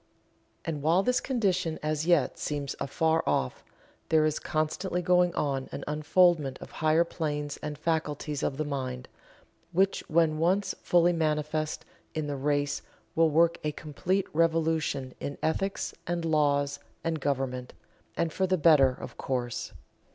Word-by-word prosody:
And 155 -3 -3
while 165 +6 +3
this 250 +2 +2
condition 185 - 0
as 155 +1 -1
yet 170 -6 +3
seems 145 -2 -3
afar 160 +3 +1
off, 65 - 0 0.5
there 155 -1 +4
is 155 -1 0
constantly 175 +4 -1
going 180 0 +4
on 135 -2 -1
an - - -5
unfoldment 150 -1 +3
of - - -10
higher 155 +1 +3
planes 150 -4 -3
and 150 -1 -5
faculties 150 -2 -2
of 135 - -1
the 155 - -1
mind, 130 -3 -4 0.7
which 190 +3 +2
when 155 -1 +2
once 185 +5 +2
fully 175 0 +4
manifest 155 -1 -1 0.3
in 155 -1 -1
the 145 -1 -3
race 145 +1 0 0.3
will 165 0 +4
work 165 +2 +3
a 150 -1 -1
complete 180 +6 -1
revolution 160 -5 +1
in 140 - -5
ethics 195 +5 -1
and 170 -1 -1
laws 145 -2 +2 0.2
and 165 -1 -1
government 130 -3 -2 0.4
and 165 -2 0
for 190 - +1
the 185 0 +2
better, 150 -4 +6
of 125 - -8
course. 125 -3 -3
155 Hz, 145 wpm, -28 LUFS, 145-170 Hz, 0.7 s, better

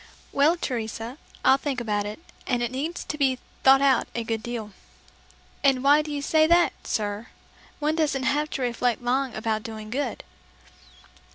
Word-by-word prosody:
"Well, 300 +5 +3
Teresa, 230 -1 -4 0.3
I'll 265 +1 +7
think 275 -3 -2
about 210 -3 -1
it, 210 +8 -7 0.3
and 245 -2 +1
it 240 - -1
needs 300 +7 -3
to 300 - -5
be 265 -2 +2 0.2
'thought 270 +1 +7
about' 270 -3 +3
a 235 - -1
good 225 -1 -2
deal." 225 -2 -5 0.9
"And 270 -2 +3
why 290 +2 +6
do 305 - -7
you 285 -1 -3
say 315 +1 +4
that, 345 +1 +4
sir? 210 +1 -2 0.5
One 305 +2 0
doesn't 285 -4 +1
have 295 +3 +1
to 265 - -2
reflect 245 0 0
long 260 +1 0
about 220 0 -1
doing 215 -1 -8
good." 280 +4 -2
260 Hz, 170 wpm, -25 LUFS, 225-290 Hz, 0.9 s, I'll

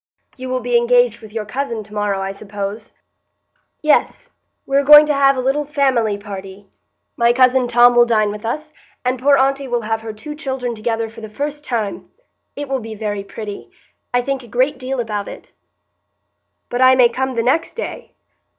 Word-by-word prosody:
"You 255 0 -7
will 255 0 -1
be 245 0 +2
engaged 240 -1 +2
with 215 -2 -12
your 220 -1 -4
cousin 235 -1 -4
to 210 0 -16
morrow, 205 -2 -1
I 195 0 -3
suppose?" 200 +1 -7 0.9
"Yes, 485 +10 +1 0.3
we 275 - -2
are 280 - +4
going 295 +1 +9
to 300 - +1
have 275 -1 +3
a - - 0
little 270 +3 0
family 265 -8 +1
party. 195 -1 -9 0.5
My 235 0 +3
cousin 255 0 +3
Tom 240 0 +5
will 240 0 +6
dine 215 -3 +2
with 210 +1 -8
us; 305 +7 -4 0.3
and 255 0 0
poor 280 +2 +4
aunty 275 +1 +1
will 240 -1 -1
have 225 0 -2
her 225 0 -6
two 220 +8 -8
children 265 -5 -4
together 225 0 -2
for 225 +1 -12
the 220 - -8
first 290 +6 -5
time. 225 -7 -3 0.5
It 290 0 -5
will 270 0 -1
be 225 -2 -8
very 205 -2 -3
pretty; 205 0 -8 0.4
I 245 0 +1
think 275 0 -2
a 240 - -14
great 255 +5 0
deal 260 0 -3
about 210 -3 -3
it." - - -11 1.2
"But 245 +1 -2
I 260 0 +7
may 250 -2 +6
come 260 +2 -3
the 230 - 0
next 300 +7 0
day?" - - -7
245 Hz, 195 wpm, -19 LUFS, 215-270 Hz, 1.2 s, going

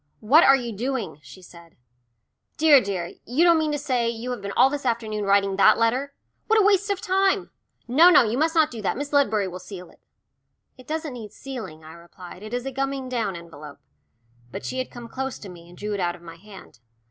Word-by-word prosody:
"What 285 +10 +5
are 275 - +7
you 240 -3 -4
doing?" 225 - -4
she 185 +4 -14
said. 170 -1 -16 0.8
"Dear, 300 -4 +6
dear, 185 -4 -4
you 260 +8 +1
don't 340 -2 +5
mean 310 -1 0
to 295 - -1
say 255 -5 -1
you 235 +2 -5
have 245 - -5
been 200 0 -5
all - - +5
this 285 +1 -4
afternoon 220 -4 -2
writing 195 -1 +2
that 215 +2 +6
letter? 255 +5 0 0.3
What 445 0 +4
a 410 - +3
waste 405 0 +3
of 400 -2 -1
time! 385 +1 +1 0.4
No, 310 +9 +6
no, 320 - +7
you 225 0 -1
must 320 +5 0
not 315 -2 +3
do 230 -3 -7
that. 200 - -2
Miss 285 +1 -5
Ledbury 220 -8 +2
will 180 0 -7
seal 180 -1 -10
it." - - -24 0.8
"It 255 -1 -17
doesn't 315 -2 -4
need 220 -4 -9
sealing," 225 -13 -8
I 160 +1 -12
replied. 175 +2 -13
"It 215 +1 -9
is 245 +1 -3
a 270 - -4
gumming 270 0 -3
down 225 -7 -2
envelope." 155 -4 -11 0.7
But - - -8
she 260 - -4
had 255 - -3
come 240 -1 -10
close 265 +2 -5
to 200 - -11
me, 170 -1 -13
and 175 - -16
drew 210 0 -4
it 200 - -3
out 175 -1 -1
of 175 - -17
my 165 -1 -11
hand. 195 - -15
235 Hz, 230 wpm, -24 LUFS, 190-275 Hz, 0.8 s, are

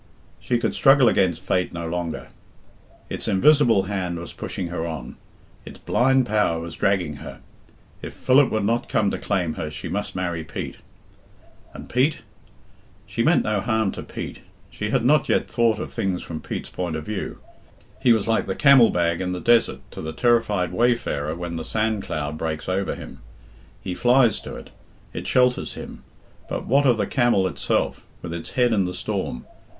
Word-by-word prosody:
She 120 - 0
could 120 - -1
struggle 135 -2 +5
against 95 -5 +2
fate 90 -1 0
no 85 -1 -4
longer. 85 -1 -4 0.8
It's - - -5
invisible 120 -1 +4
hand 95 -3 -3
was 85 -1 -8
pushing 90 -3 -5
her 85 -1 -3
on. 80 -7 -6 0.5
It's - - -11
blind 130 +1 +2
power 105 -7 +1
was 85 0 -7
dragging 90 -7 0
her. - - -9 0.6
If - - -8
Philip 130 +1 +4
would 110 -2 -1
not 115 +3 0
come 105 -2 +2
to - - -3
claim 90 -6 -1
her 75 - -3
she 75 - -7
must 105 +1 -3
marry 85 -3 -2
Pete. 70 -3 -6 0.9
And - - -10
Pete? 135 +5 +1 0.8
She - - -3
meant - - +4
no 105 -2 0
harm 110 -2 +1
to - - -7
Pete. - - -7 0.3
She 105 - -4
had 120 0 +1
not 150 +2 +3
yet - - +2
thought 115 -3 +2
of - - -6
things 95 -2 -2
from 80 -2 -6
Pete's - - -5
point 90 -3 -3
of 80 -1 -5
view. 105 +1 -4 0.6
He 130 -3 +5
was 110 -2 +2
like 115 0 +1
the 95 - -2
camel 140 -5 +7
bag 85 0 0
in 90 0 -2
the 90 - -3
desert 120 +4 +3
to - - -7
the 80 0 -5
terrified 110 -4 +2
wayfarer 80 -11 0
when 85 -1 -5
the 80 - -4
sand 110 +1 -1
cloud 75 -2 -4
breaks 80 -1 -3
oyer 95 +1 -1
him. 65 - -10 0.6
He 95 - -3
flies 120 +3 +3
to - - -8
it. - - -11 0.4
It - - -5
shelters 125 0 +2
him. - - -9 0.5
But - - -3
what 140 +2 +3
of 120 -3 +4
the 105 - 0
camel 120 -4 +2
itself, 95 - -1 0.2
with 85 -1 -5
its 85 -1 -6
head 120 -2 +4
in 100 -4 +2
the 90 0 -4
storm? 60 -7 -3
100 Hz, 185 wpm, -23 LUFS, 85-120 Hz, 0.9 s, camel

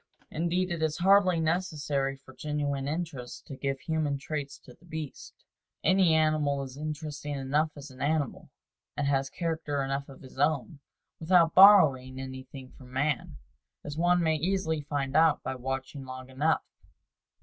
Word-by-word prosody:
Indeed, 175 +3 0
it 170 -2 -3
is 155 -1 0
hardly 185 -1 +4
necessary 150 -5 -1
for 135 -1 -17
genuine 145 -1 -2
interest 150 -6 -5
to 135 - -8
give 135 0 -3
human 155 -3 -1
traits 140 0 -5
to 125 - -15
the - - -25
beasts. 160 -4 -7 0.5
Any 185 -4 +4
animal 155 -3 +2
is 130 -1 -9
interesting 150 -1 -5
enough 140 +3 0
as 145 -1 -10
an 130 - -13
animal, 145 -2 -1 0.5
and 145 - 0
has 135 -1 +1
character 160 -3 -2
enough 135 +1 -3
of 135 - -13
his 130 0 -13
own, 145 +1 0 0.4
without 165 0 +4
borrowing 145 -10 +7
anything 130 0 -8
from 125 -2 -15
man 135 0 -1 0.5
as 145 - -6
one 175 +2 +3
may 160 -1 +2
easily 160 -2 -1
find 140 -2 -3
out 160 -1 +4
by - - -3
watching 135 +2 -5
long 130 0 -9
enough. 150 +5 +1
145 Hz, 155 wpm, -29 LUFS, 135-160 Hz, 0.5 s, borrowing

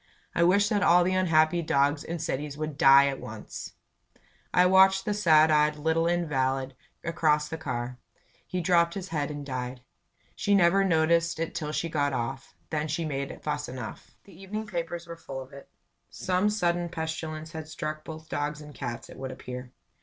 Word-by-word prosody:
"I - - +1
wish 200 +4 +4
that 205 -1 +1
all 175 -2 +6
the 185 +1 +1
unhappy 170 -2 +3
dogs 145 -1 +1
in 170 - -4
cities 145 -2 -3
would 155 -1 -4
die 140 -3 +7
at 135 -1 -2
once!" 110 0 -8 0.8
I 180 - +5
watched 190 +1 +5
the 210 - 0
sad 160 -6 +5
eyed 150 0 +3
little 160 +2 +1
invalid 135 -6 0 0.3
across 155 -3 +1
the 160 - -6
car. 125 -4 -4 0.5
He 185 - -2
dropped 170 -1 +3
his 190 -1 -5
head 150 -3 -1
and 145 -1 -6
died. 125 -1 -4 0.5
She 205 - +2
never 195 +1 +5
noticed 170 -2 +2
it 165 - -2
till 155 -3 -3
she 170 - -1
got 145 -3 0
off; 130 +2 -4 0.2
then 155 0 -1
she 160 +2 -2
made 140 -2 -4
fuss 150 -1 -2
enough. 125 -3 -8
The 195 - -16
evening 210 +3 -4
papers 170 -3 -4
were 170 0 -8
full 135 -4 -7
of 130 0 -10
it. 140 - -12 0.4
Some 185 +3 0
sudden 175 -4 0
pestilence 160 -1 -5
had 160 -2 -7
struck 155 -1 -5
both 160 0 -9
dogs 145 0 -2
and 150 -1 -11
cats, 120 -1 -5
it - - -12
would 130 0 -5
appear. 125 0 -8
160 Hz, 185 wpm, -28 LUFS, 145-175 Hz, 0.8 s, die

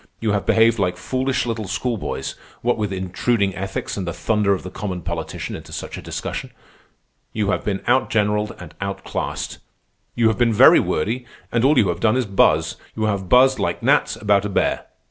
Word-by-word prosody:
You 110 -2 0
have 100 -1 -1
behaved 115 0 +4
like 90 -2 0
foolish 130 0 -1
little 115 -3 -3
schoolboys, 115 +3 -3 0.3
what 120 +1 +2
with 105 -3 -2
intruding 95 +2 0
ethics 95 +2 -4
and 95 -3 -3
the 85 - -2
thunder 105 0 +1
of 95 - 0
the 90 - -7
common 95 -3 -5
politician - - -4
into - - -10
such - - -6
a - - -7
discussion. - - -5 0.8
You 105 -2 0
have - - -1
been 100 -2 -2
outgeneralled 105 -4 +1
and 85 -4 -10
outclassed. 100 0 -4 0.6
You 115 -2 +3
have 110 - -2
been 120 -2 +3
very - - +8
wordy, 115 +10 -1 0.2
and 115 0 +1
all 145 +2 +4
you 100 -6 +4
have 85 0 -2
done 110 +4 +3
is 130 - +1
buzz. 100 -2 +2 0.2
You 110 - -2
have 100 -4 -1
buzzed 130 +1 +5
like - - -2
gnats - - +3
about 100 -1 +2
a 105 - -2
bear. 100 - 0
105 Hz, 190 wpm, -21 LUFS, 95-115 Hz, 0.8 s, very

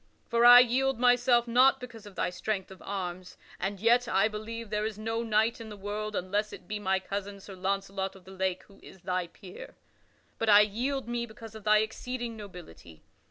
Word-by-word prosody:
For 235 0 +1
I 245 0 +11
yield 260 +1 +1
myself 245 0 +4
not 255 +3 +5
because 235 -4 -10
of 200 - -13
thy - - -1
strength 190 +1 -3
of 190 - -13
arms 185 -2 -6 0.2
(and 195 +2 -3
yet 240 +3 +3
I 195 -1 +3
believe 220 +1 -7
there 210 0 0
is 215 -1 -3
no 225 +1 -2
knight 225 +1 +1
in 220 - -8
the 210 - -9
world, 210 +1 -4
unless 205 +4 -1
it - - -11
be 210 -1 -4
my 190 -1 +1
cousin 200 +1 -5
Sir 195 0 -11
Launcelot 195 0 -3
of 190 - -16
the 190 - -12
Lake, 190 -1 -2
who 200 - -20
is 190 - -15
thy 180 -1 -2
peer), 180 +2 -12 0.6
but 225 - 0
I 205 0 +9
yield 245 +6 -1
me 240 0 -2
because 225 0 -12
of 220 -1 -11
thy 215 0 +5
exceeding 235 +2 -4
nobility. 175 - -12
210 Hz, 205 wpm, -29 LUFS, 195-235 Hz, 0.6 s, I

